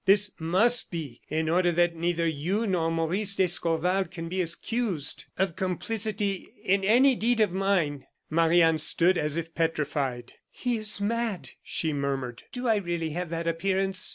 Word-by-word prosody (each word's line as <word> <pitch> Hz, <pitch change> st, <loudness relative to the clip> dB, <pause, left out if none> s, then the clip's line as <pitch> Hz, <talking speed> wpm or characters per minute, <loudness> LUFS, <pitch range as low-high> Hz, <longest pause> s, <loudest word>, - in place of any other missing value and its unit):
This 205 Hz, +1 st, +5 dB
must 200 Hz, +9 st, +2 dB
be, 155 Hz, -9 st, -6 dB
in 160 Hz, +1 st, -1 dB
order 175 Hz, +2 st, +3 dB
that 175 Hz, 0 st, +2 dB
neither 170 Hz, 0 st, 0 dB
you 170 Hz, +8 st, -1 dB
nor 175 Hz, -5 st, +1 dB
Maurice 175 Hz, +5 st, +1 dB
d'Escorval 180 Hz, +1 st, +2 dB
can 165 Hz, -1 st, -7 dB
be 185 Hz, +1 st, -1 dB
accused 180 Hz, -, -2 dB
of 190 Hz, -3 st, 0 dB
complicity 200 Hz, +1 st, -2 dB, 0.2 s
in 195 Hz, +1 st, +2 dB
any 250 Hz, +7 st, +5 dB
deed 240 Hz, 0 st, +1 dB
of 210 Hz, -4 st, +3 dB
mine." 180 Hz, -8 st, 0 dB, 0.2 s
Marie 165 Hz, +2 st, +4 dB
Anne 165 Hz, -1 st, +3 dB
stood 175 Hz, +4 st, +2 dB
as 150 Hz, -1 st, -1 dB
if 165 Hz, 0 st, -4 dB
petrified. 145 Hz, -6 st, -2 dB, 0.2 s
"He 245 Hz, -2 st, -2 dB
is 215 Hz, -1 st, -2 dB
mad!" 225 Hz, -1 st, -2 dB
she 160 Hz, -2 st, -2 dB
murmured. 135 Hz, -4 st, -3 dB
"Do 250 Hz, 0 st, -4 dB
I 220 Hz, -2 st, +4 dB
really 170 Hz, -4 st, -2 dB
have 175 Hz, +2 st, -4 dB
that 165 Hz, 0 st, -3 dB
appearance?" 190 Hz, +3 st, 0 dB
175 Hz, 160 wpm, -27 LUFS, 165-200 Hz, 0.2 s, This